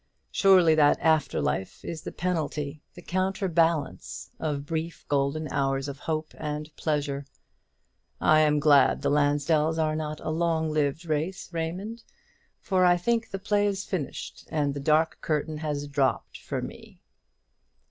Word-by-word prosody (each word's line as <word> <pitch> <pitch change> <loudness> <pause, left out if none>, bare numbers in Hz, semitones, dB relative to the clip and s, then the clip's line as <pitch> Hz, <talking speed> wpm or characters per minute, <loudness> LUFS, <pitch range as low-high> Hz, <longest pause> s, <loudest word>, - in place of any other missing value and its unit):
Surely 185 -5 +5
that 150 -2 +4
after 155 -3 +2
life 95 -1 -2
is 165 -2 -5
the - - -6
penalty, 155 -4 -2
the 175 - -11
counter 190 +2 -1
balance, 165 -4 0
of 145 -3 -2
brief 165 +2 -4
golden 145 +2 0
hours 135 0 0
of 140 0 -6
hope 155 0 -3
and 150 0 -5
pleasure. 145 -2 -1 1.0
I 155 - +5
am 150 -1 +4
glad 145 -2 +4
the - - +2
Lansdells 150 +2 +2
are 155 -1 +1
not 155 -1 -4
a - - -3
long 160 -1 0
lived 155 +2 0
race, 165 +4 -3
Raymond; 185 +8 -4 0.6
for 185 -2 +1
I 175 -1 +5
think 230 +5 0
the 195 - -4
play 205 +1 +1
is 200 0 -2
finished, 170 -8 -5
and 145 -3 0
the 140 - -4
dark 155 +3 +2
curtain 155 0 -1
has 145 -2 -3
dropped 140 -2 -1
for - - -4
me!" - - -10
155 Hz, 150 wpm, -27 LUFS, 145-170 Hz, 1.0 s, Surely